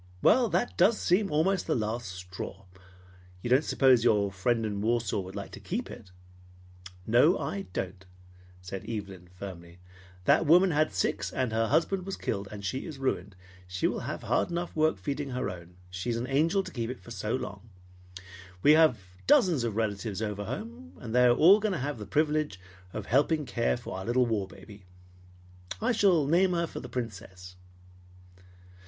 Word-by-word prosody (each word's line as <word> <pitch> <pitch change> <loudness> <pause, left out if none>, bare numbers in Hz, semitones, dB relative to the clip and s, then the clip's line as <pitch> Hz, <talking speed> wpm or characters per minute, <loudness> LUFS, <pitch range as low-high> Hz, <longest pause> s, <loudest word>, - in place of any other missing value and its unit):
Well, 245 -3 +5
that 240 - 0
does 205 +5 +5
seem 190 +3 +2
almost 170 +5 +1
the - - +1
last 115 0 -2
straw! 90 +1 -8 0.8
You 120 - -3
don't 130 +4 +5
suppose 130 -5 +4
your 105 -4 +3
friend 115 +4 0
in 100 -2 -3
Warsaw 115 -2 0
would 95 0 -7
like 100 - -6
to - - -9
keep 230 +7 -4
it?" 100 - -11 1.0
"No, 125 - +4
I 195 0 -4
don't," 95 0 -5 0.6
said 90 +1 -7
Evelyn 100 -5 -6
firmly. 90 -2 -10 0.5
"That 165 - +4
woman 180 +4 +6
has 155 -9 +1
six, 95 +1 -1
and 130 -3 -1
her 115 0 +1
husband 175 - +1
was 195 - -4
killed, 100 -1 -3
and 100 -1 -7
she 130 - -3
is 155 -4 -7
ruined. 105 -7 -2 0.3
She 90 +1 -3
will - - +1
have - - -5
hard - - +1
enough 175 0 -4
work 155 0 +2
feeding 140 0 -4
her 125 0 -2
own. 90 0 -11 0.2
She 90 +6 -4
is 115 - 0
an 120 - -2
angel 160 +9 +2
to - - -9
keep 115 -2 -3
it 120 -8 -8
so, - - -2
long. 100 +3 -7 0.9
We 150 - +7
have 155 -5 +5 0.3
dozens 185 - +4
of 115 -3 -2
relatives 105 -2 -2
over 105 -2 -3
home, 110 -6 -7
and 115 -2 -7
they 125 0 +5
are 120 - +5
all 190 - +7
going 215 -2 0
to - - -1
have 140 -2 -3
the 105 - -7
privilege 150 -5 0 0.3
of 105 +1 -5
helping 145 +5 +2
to 125 - -12
care 115 +1 +1
for 120 -5 -7
our 95 - -7
little 125 +2 +2
war 110 -5 -1
baby. 100 -1 -14 0.9
I 230 +3 +1
shall 190 - +3
name 180 +5 +3
her 170 -1 +1
for - - -7
the 125 - -9
Princess." 95 -7 -7
120 Hz, 185 wpm, -29 LUFS, 100-155 Hz, 1.0 s, We